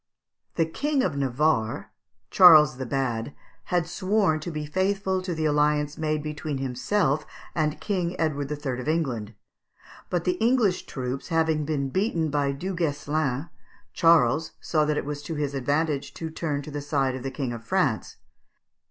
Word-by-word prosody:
The 165 - +2
King 280 - 0
of 160 - -1
Navarre, 135 -3 0 0.4
Charles 155 -8 +8
the 130 -1 -4
Bad, 125 -1 -2 0.3
had 175 -2 +1
sworn 185 -1 +1
to 155 - -5
be 155 -2 -4
faithful 190 +3 0
to 180 -2 -3
the 160 0 -1
alliance 150 0 +2
made 155 -1 -1
between 150 -1 -4
himself 135 +4 0 0.3
and 155 -2 0
King 180 -4 -2
Edward 145 -3 -1
III. 140 -4 -3
of 125 - -8
England; 125 -10 -1 0.7
but 175 -2 0
the 180 0 0
English 230 -6 +2
troops 130 0 -4
having 160 -2 +1
been 140 -3 -1
beaten 170 - 0
by 140 -1 +1
Du 180 +8 -4
Guesclin, 145 -3 -1 0.4
Charles 160 -2 +4
saw 155 -2 +1
that 150 0 0
it - - -2
was 145 0 -4
to 160 +2 -5
his 145 -2 -2
advantage 145 +2 -1
to 160 -1 -5
turn 150 -3 -3
to 150 - -8
the 145 0 -4
side 140 -2 0
of 130 - -5
the 135 - -3
King 130 -2 -3
of 115 -1 -8
France. - - 0
150 Hz, 165 wpm, -26 LUFS, 140-165 Hz, 0.7 s, Charles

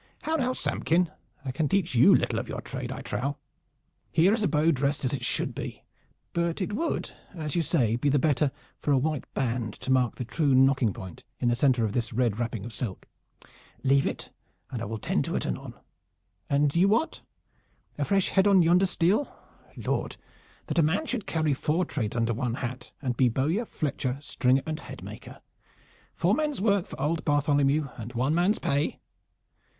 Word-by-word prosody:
How 320 - 0
now, 255 -5 +1
Samkin? 175 -8 0 0.3
I 130 - -2
can 150 +2 -1
teach 190 -6 +1
you 120 - +7
little - - +1
of - - -5
your - - -4
trade, - - -5
I - - -6
trow. 140 +3 -2 0.7
Here 180 +6 +4
is 225 - 0
a 205 - +3
bow 155 0 +3
dressed 140 0 0
as 130 - 0
it 130 -3 -3
should - - -1
be; - - -6 0.5
but 170 +1 0
it 195 +1 -2
would, 325 +10 -2 0.2
as 155 -2 -3
you 170 - +3
say, 120 -7 +1
be 145 +4 +1
the 145 - +3
better 145 0 +2 0.3
for 150 - -1
a 140 - +5
white 150 +1 -2
band 115 -4 -1
to 130 - -4
mark 125 -3 +2
the 125 - -4
true 140 +2 +1
nocking 130 -3 +4
point 95 -2 -9 0.2
in 120 - +2
the 120 - +2
center 125 -2 +3
of 105 - -2
this 120 -2 -1
red 120 -2 +1
wrapping 115 -4 -3
of 120 - -7
silk. 105 -6 -5 0.8
Leave 135 +1 +4
it - - -5 0.4
and 120 - -4
I - - -2
will 110 +2 -4
tend - - 0
to - - -3
it - - -1
anon. - - -4 0.7
And 145 +1 +2
you, 180 +3 +5
Wat? 225 +10 +1 0.8
A - - +2
fresh 195 -2 +2
head 195 +1 +3
on 195 -3 +6
yonder 180 +3 +4
stele? 185 +9 +1 0.5
Lord, - - -2 0.5
that - - 0
a - - +7
man 160 - +1
should 235 -9 -3
carry 155 -3 +1
four 155 +6 0
trades 110 -1 -3
under 115 -1 +1
one 120 +1 -2
hat, 125 0 -5
and 125 -2 -1
be 125 0 +4
bowyer, 155 - 0
fletcher, 135 - -2
stringer 135 -2 +1
and 155 0 -3
headmaker! - - -10 0.7
Four - - +2
men's 300 -2 0
work 200 -2 +2
for - - -9
old 155 +4 0
Bartholomew 145 0 +2
and 115 +2 -7
one 130 +5 +1
man's 180 +6 +3
pay!" 140 +2 -1
145 Hz, 195 wpm, -27 LUFS, 125-170 Hz, 0.8 s, you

